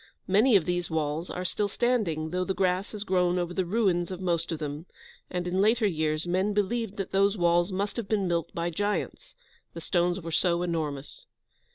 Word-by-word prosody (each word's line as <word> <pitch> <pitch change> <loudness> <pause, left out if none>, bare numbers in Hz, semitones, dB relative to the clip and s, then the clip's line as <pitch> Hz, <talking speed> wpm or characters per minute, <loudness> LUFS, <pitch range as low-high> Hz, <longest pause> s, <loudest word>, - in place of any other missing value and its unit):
Many 215 +5 +4
of 180 -5 +4
these 175 -1 -1
walls 160 +1 -2
are 180 +1 -4
still 205 +3 0
standing, 200 -9 0
though 180 +1 0
the 190 +1 -2
grass 185 0 0
has 210 -1 -4
grown 180 -2 +2
over 175 0 -2
the 185 -1 -1
ruins 185 -4 +1
of 185 -2 -5
most 170 -2 -1
of 165 - -2
them, 150 +2 -5 0.4
and 180 0 -3
in 185 +2 +1
later 220 +2 +3
years, 155 -4 0
men 190 +4 0
believed 210 0 -1
that 195 - -4
those 200 +2 +3
walls 175 +1 +3
must 200 +4 -2
have 230 -4 -3
been 200 -3 +1
built 170 -2 -1
by 170 +1 -2
giants, 205 +5 -3 0.4
the - - -5
stones 175 +1 +1
are 165 -3 -6
so 170 +1 +1
enormous. 155 -5 -4
180 Hz, 200 wpm, -28 LUFS, 170-200 Hz, 0.4 s, Many